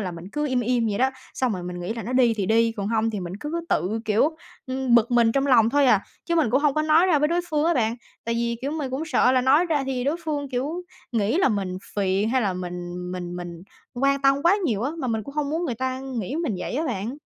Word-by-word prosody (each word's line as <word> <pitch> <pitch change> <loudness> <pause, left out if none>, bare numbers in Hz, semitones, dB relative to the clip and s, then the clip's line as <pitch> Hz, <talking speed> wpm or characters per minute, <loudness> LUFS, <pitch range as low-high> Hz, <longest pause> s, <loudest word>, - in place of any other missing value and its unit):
là, 185 -4 -3
mình 170 +1 -9
cứ 295 0 -1
im 255 -2 +1
im 240 0 +1
vậy 205 - -2
đó, 260 +1 +3 0.2
xong 255 -3 0
rồi 180 -3 -4
mình 175 0 -6
nghĩ 180 +6 -3
là 230 - -5
nó 235 +5 -5
đi 245 -3 +4
thì 200 -3 -2
đi, 230 +1 +3
còn 205 -2 -4
hông 225 0 +1
thì 205 -3 -4
mình 175 0 -6
cứ 320 +3 -3
tự, 200 +7 0
kiểu, 225 +10 +2 0.3
ưm, 260 -1 0
bực 235 +1 +4
mình 235 -2 +4
trong 275 0 +1
lòng 230 -4 +5
thôi 285 0 +3
à, 215 -6 +5 0.2
chứ 340 - -1
mình 310 -9 +2
cũng 265 +4 +3
hông 295 -2 +2
có 310 - +1
nói 315 +4 +4
ra 320 -5 +4
với 300 +1 +2
đối 345 +1 +1
phương 300 -1 +1
á 340 +1 +3
bạn. 230 -2 +1 0.3
Tại 230 0 -1
vì, 235 0 -1
kiểu, 280 - -1
mình 295 -4 -3
cũng 265 +4 -3
sợ 255 -4 +3
là 255 - +4
nói 275 +7 +4
ra 300 -5 +1
thì 260 -2 -2
đối 290 +4 +1
phương, 290 -3 -2
kiểu, 285 +8 -3 0.3
nghĩ 220 +4 +1
là 375 - +4
mình 190 -4 -2 0.2
phiền 195 +1 +1
hay 255 +2 +2
là 195 - 0
mình 180 -1 -5 0.2
mình 175 -1 -5
mình 175 -1 -7 0.3
quan 275 +2 +1
tâm 275 +1 +3
quá 355 +4 +5
nhiều 225 - 0
á, 275 - 0
mà 260 - -2
mình 220 -1 -1
cũng 280 +7 -10
hông 295 -1 -1
muốn 330 +3 -1
người 260 -8 -2
ta 260 +2 -3 0.2
nghĩ 235 +9 -4
mình 320 - -1
vậy 180 - -4
á 305 +5 0
bạn. 235 +2 -3
250 Hz, 280 wpm, -24 LUFS, 215-285 Hz, 0.3 s, lòng